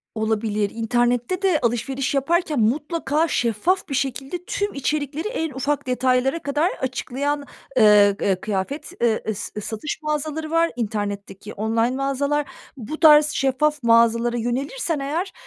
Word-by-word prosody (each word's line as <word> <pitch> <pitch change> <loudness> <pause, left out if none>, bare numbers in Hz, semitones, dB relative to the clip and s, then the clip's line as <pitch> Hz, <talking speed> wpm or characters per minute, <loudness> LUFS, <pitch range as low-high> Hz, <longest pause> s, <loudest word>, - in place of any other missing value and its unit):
Olabilir. 215 -1 0
İnternette 240 - 0
de 370 -6 +3
alışveriş 255 +3 -1
yaparken 305 +1 +1
mutlaka 300 +6 +1
şeffaf 275 - 0
bir - - -3
şekilde 275 +6 -3
tüm 405 +1 -2
içerikleri 290 +4 -2
en 325 -9 -3
ufak 280 +1 -2
detaylara 255 +4 +1
kadar 295 +5 0
açıklayan, 280 +3 -2 0.3
ııı, 210 -3 +6
ııı, 190 -2 +1
kıyafet, 215 - -3
ııı, 225 -2 +2
ıs 210 -1 -3
satış 220 +10 -4
mağazaları 305 +1 -3
var, 330 0 +3
internetteki 205 -2 -4
online 225 +3 0
mağazalar. 275 +2 0 0.3
Bu 260 +6 -6
tarz 300 -2 +7
şeffaf 285 +1 0
mağazalara 230 +1 +3
yönelirsen 275 - -2
eğer, 325 +8 -2
270 Hz, 130 wpm, -22 LUFS, 230-300 Hz, 0.3 s, tarz